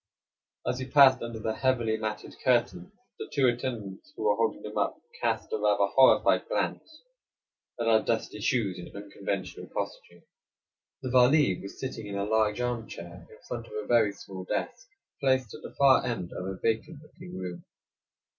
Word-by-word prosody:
As 125 Hz, +1 st, -1 dB
we 130 Hz, -, -4 dB
passed 135 Hz, -1 st, +7 dB
under 115 Hz, -1 st, -5 dB
the 110 Hz, 0 st, -2 dB
heavy 120 Hz, -4 st, +1 dB
matted 110 Hz, -1 st, -5 dB
curtains 175 Hz, -, +1 dB, 0.3 s
the -, -, -6 dB
two 140 Hz, -2 st, +2 dB
attendants 120 Hz, -, -3 dB
who 390 Hz, -, -5 dB
were 470 Hz, +2 st, +3 dB
holding 455 Hz, -, -1 dB
them -, -, -7 dB
up -, -, 0 dB, 0.2 s
cast 455 Hz, -, -1 dB
a -, -, +2 dB
rather -, -, +3 dB
horrified -, -, +5 dB
glance 315 Hz, -1 st, -3 dB, 0.8 s
at 115 Hz, -, 0 dB
our 110 Hz, -1 st, +5 dB
dusty 110 Hz, -2 st, -2 dB
shoes 105 Hz, -4 st, 0 dB
and 90 Hz, -, -10 dB
unconventional 100 Hz, -2 st, -5 dB
costume. -, -, -6 dB, 0.8 s
The 130 Hz, -, -3 dB
Vali 130 Hz, -, +4 dB
was 100 Hz, -, -9 dB
sitting 115 Hz, -5 st, -5 dB
in 100 Hz, -, -5 dB
a 100 Hz, -, -1 dB
large 110 Hz, 0 st, +1 dB
arm 120 Hz, -2 st, -2 dB
chair 85 Hz, 0 st, -10 dB
in 110 Hz, -, -15 dB
front 115 Hz, -1 st, -5 dB
of -, -, -13 dB
a 105 Hz, 0 st, -4 dB
very 115 Hz, -4 st, +4 dB
small 95 Hz, -1 st, -9 dB
desk, 230 Hz, -, -3 dB, 0.3 s
placed 130 Hz, -5 st, +1 dB
at -, -, -9 dB
the 120 Hz, -, -10 dB
far 135 Hz, -2 st, +6 dB
end 115 Hz, -8 st, -3 dB
of 90 Hz, -, -5 dB
a 95 Hz, -1 st, -4 dB
vacant 140 Hz, -, -2 dB
looking 175 Hz, -, -11 dB
room. 90 Hz, -2 st, -6 dB
115 Hz, 175 wpm, -28 LUFS, 100-130 Hz, 0.8 s, passed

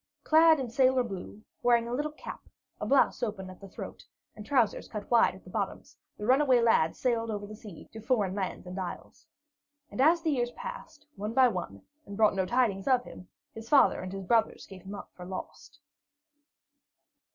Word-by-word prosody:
Clad 320 Hz, 0 st, +6 dB
in 260 Hz, -, -3 dB
sailor 260 Hz, +1 st, +3 dB
blue, 205 Hz, -1 st, -8 dB, 0.2 s
wearing 235 Hz, -1 st, +3 dB
a 240 Hz, -, -4 dB
little 295 Hz, +4 st, -1 dB
cap, 305 Hz, -, -10 dB, 0.3 s
a -, -, -3 dB
blouse 275 Hz, -1 st, +3 dB
open 200 Hz, -5 st, -4 dB
at 185 Hz, -, -15 dB
the 195 Hz, -, -10 dB
throat, -, -, -9 dB, 0.3 s
and 210 Hz, -, -9 dB
trousers 235 Hz, -2 st, +1 dB
cut 210 Hz, 0 st, -7 dB
wide 235 Hz, -5 st, +4 dB
at 190 Hz, -, -15 dB
the 180 Hz, -, -13 dB
bottoms, 200 Hz, -2 st, -4 dB, 0.2 s
the 210 Hz, -, -5 dB
runaway 260 Hz, +1 st, +4 dB
lad 225 Hz, -9 st, +3 dB
sailed 230 Hz, -3 st, 0 dB
over 205 Hz, -1 st, -4 dB
the 215 Hz, +1 st, -9 dB
sea 210 Hz, -6 st, -12 dB
to 220 Hz, -, -8 dB
foreign 215 Hz, -5 st, 0 dB
lands 190 Hz, -2 st, -4 dB
and 180 Hz, +2 st, -6 dB
isles. 190 Hz, -, -7 dB, 0.6 s
And -, -, -2 dB
as 330 Hz, +4 st, +4 dB
the 320 Hz, -, +1 dB
years 240 Hz, -4 st, 0 dB
passed, 480 Hz, -11 st, -9 dB
one 210 Hz, +3 st, -4 dB
by 260 Hz, -2 st, +6 dB
one, 175 Hz, -, -6 dB, 0.2 s
and 200 Hz, -, -8 dB
brought 215 Hz, -2 st, +4 dB
no 190 Hz, -1 st, -1 dB
tidings 225 Hz, -5 st, +1 dB
of 255 Hz, -2 st, +3 dB
him, 180 Hz, -, -12 dB, 0.3 s
his 225 Hz, +1 st, -10 dB
father 285 Hz, -, +5 dB
and 185 Hz, 0 st, -6 dB
his 195 Hz, 0 st, -6 dB
brothers 225 Hz, +4 st, +1 dB
gave 190 Hz, -1 st, -12 dB
him 195 Hz, +2 st, -8 dB
up -, -, -10 dB
for 180 Hz, -, -11 dB
lost. 185 Hz, +10 st, -8 dB
225 Hz, 195 wpm, -29 LUFS, 195-255 Hz, 0.6 s, Clad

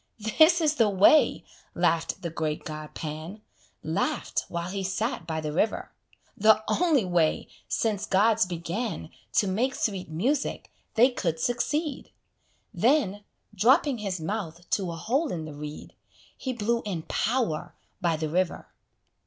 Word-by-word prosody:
"This 330 Hz, +2 st, +7 dB
is 305 Hz, -1 st, +2 dB
the 225 Hz, -3 st, +4 dB
way," 205 Hz, +10 st, +5 dB, 0.3 s
laugh'd 165 Hz, +1 st, 0 dB
the 170 Hz, -, -3 dB
great 155 Hz, -2 st, -2 dB
god 155 Hz, -1 st, -7 dB
Pan, 160 Hz, +7 st, -6 dB, 0.4 s
(Laugh'd -, -, -1 dB
while 170 Hz, +1 st, -3 dB
he 195 Hz, 0 st, -3 dB
sat 205 Hz, 0 st, -2 dB
by 160 Hz, -1 st, -2 dB
the 150 Hz, -1 st, -4 dB
river) 215 Hz, +7 st, 0 dB, 0.4 s
"The 215 Hz, +1 st, +5 dB
only 315 Hz, -, +2 dB
way, 175 Hz, -3 st, +1 dB, 0.2 s
since 210 Hz, -3 st, -1 dB
gods 210 Hz, +1 st, +3 dB
began 175 Hz, -, -4 dB, 0.2 s
To 205 Hz, -, +3 dB
make 235 Hz, +8 st, 0 dB
sweet 195 Hz, -6 st, -2 dB
music, 255 Hz, -, -1 dB, 0.2 s
they 245 Hz, +4 st, +6 dB
could 165 Hz, -9 st, -2 dB
succeed." 280 Hz, -, -1 dB, 0.6 s
Then, 225 Hz, -6 st, +2 dB, 0.3 s
dropping 260 Hz, -, +3 dB
his 195 Hz, -4 st, -3 dB
mouth 170 Hz, -1 st, -4 dB
to 190 Hz, -4 st, 0 dB
a -, -, -5 dB
hole 270 Hz, -, 0 dB
in 160 Hz, -3 st, -4 dB
the 155 Hz, -, -8 dB
reed, 150 Hz, +1 st, -8 dB, 0.4 s
He 260 Hz, -, -4 dB
blew 235 Hz, 0 st, 0 dB
in 180 Hz, -6 st, -4 dB
power 225 Hz, -8 st, -1 dB, 0.3 s
by 170 Hz, -2 st, +2 dB
the 155 Hz, 0 st, -2 dB
river. 180 Hz, +2 st, -1 dB
200 Hz, 145 wpm, -27 LUFS, 165-240 Hz, 0.6 s, This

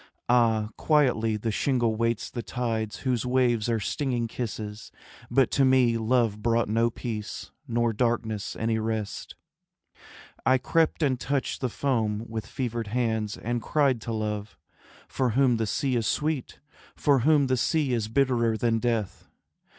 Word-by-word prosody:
Ah, 115 Hz, -3 st, +3 dB
quietly 125 Hz, -8 st, +2 dB
the 110 Hz, +1 st, -2 dB
shingle 120 Hz, -1 st, +1 dB
waits 115 Hz, 0 st, -1 dB
the 120 Hz, -, -4 dB
tides 110 Hz, -1 st, -3 dB
Whose 125 Hz, -4 st, 0 dB
waves 125 Hz, -3 st, +1 dB
are 115 Hz, -1 st, +1 dB
stinging 120 Hz, +1 st, -1 dB
kisses, 110 Hz, -3 st, -6 dB, 0.4 s
but 135 Hz, -3 st, +3 dB
to 140 Hz, -, +3 dB
me 130 Hz, -3 st, +4 dB
Love 115 Hz, -2 st, +1 dB
brought 115 Hz, +1 st, +2 dB
no 115 Hz, +2 st, +2 dB
peace, 110 Hz, -2 st, -6 dB, 0.2 s
nor 120 Hz, -1 st, +1 dB
darkness 110 Hz, -3 st, -1 dB
any 110 Hz, 0 st, 0 dB
rest. 110 Hz, -1 st, -4 dB, 1.1 s
I 130 Hz, -, +4 dB
crept 165 Hz, +4 st, +1 dB
and 130 Hz, -4 st, +1 dB
touched 140 Hz, 0 st, -2 dB
the 130 Hz, -, 0 dB
foam 110 Hz, -4 st, -1 dB
with 110 Hz, -1 st, -5 dB
fevered 120 Hz, -4 st, -3 dB
hands 110 Hz, -2 st, -1 dB
And 120 Hz, +1 st, -2 dB
cried 135 Hz, -5 st, +1 dB
to 115 Hz, -, -5 dB
Love, 105 Hz, -1 st, -3 dB, 0.5 s
from 125 Hz, -4 st, -1 dB
whom 130 Hz, -2 st, +3 dB
the 110 Hz, -1 st, -1 dB
sea 130 Hz, +5 st, 0 dB
is 115 Hz, -3 st, 0 dB
sweet, 150 Hz, -4 st, -2 dB, 0.4 s
From 140 Hz, -3 st, +3 dB
whom 150 Hz, +1 st, +4 dB
the 130 Hz, -1 st, +1 dB
sea 140 Hz, +1 st, +1 dB
is 115 Hz, -3 st, 0 dB
bitterer 115 Hz, -2 st, +1 dB
than 115 Hz, 0 st, +1 dB
death. 115 Hz, -4 st, -2 dB
115 Hz, 150 wpm, -26 LUFS, 110-130 Hz, 1.1 s, me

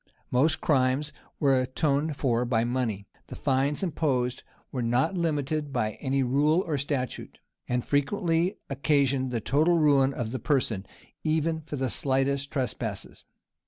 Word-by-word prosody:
[] -, -, -39 dB
Most 145 Hz, +5 st, +2 dB
crimes 135 Hz, +1 st, +1 dB, 0.3 s
were 135 Hz, -3 st, +4 dB
atoned 145 Hz, +3 st, 0 dB
for 120 Hz, -4 st, +1 dB
by 120 Hz, -2 st, +1 dB
money; 120 Hz, -5 st, -1 dB, 0.2 s
the -, -, -8 dB
fines 140 Hz, +4 st, 0 dB
imposed 135 Hz, -8 st, 0 dB, 0.3 s
were 130 Hz, -, -2 dB
not 125 Hz, +9 st, +1 dB
limited 155 Hz, -3 st, -1 dB
by 110 Hz, -4 st, 0 dB
any 135 Hz, -1 st, +1 dB
rule 150 Hz, +7 st, +3 dB
or 155 Hz, -, -1 dB
statute; 140 Hz, -2 st, -3 dB, 0.3 s
and 125 Hz, 0 st, 0 dB
frequently 170 Hz, +5 st, +1 dB
occasioned 135 Hz, -1 st, +1 dB
the 120 Hz, -2 st, -1 dB
total 155 Hz, +9 st, +3 dB
ruin 140 Hz, -4 st, +4 dB
of 120 Hz, -5 st, -4 dB
the 130 Hz, -, -3 dB
person, 115 Hz, -9 st, 0 dB, 0.4 s
even 160 Hz, +1 st, 0 dB
for 150 Hz, -1 st, -6 dB
the 135 Hz, -1 st, -1 dB
slightest 135 Hz, +2 st, 0 dB
trespasses. 120 Hz, -6 st, -4 dB
140 Hz, 145 wpm, -27 LUFS, 125-150 Hz, 0.4 s, were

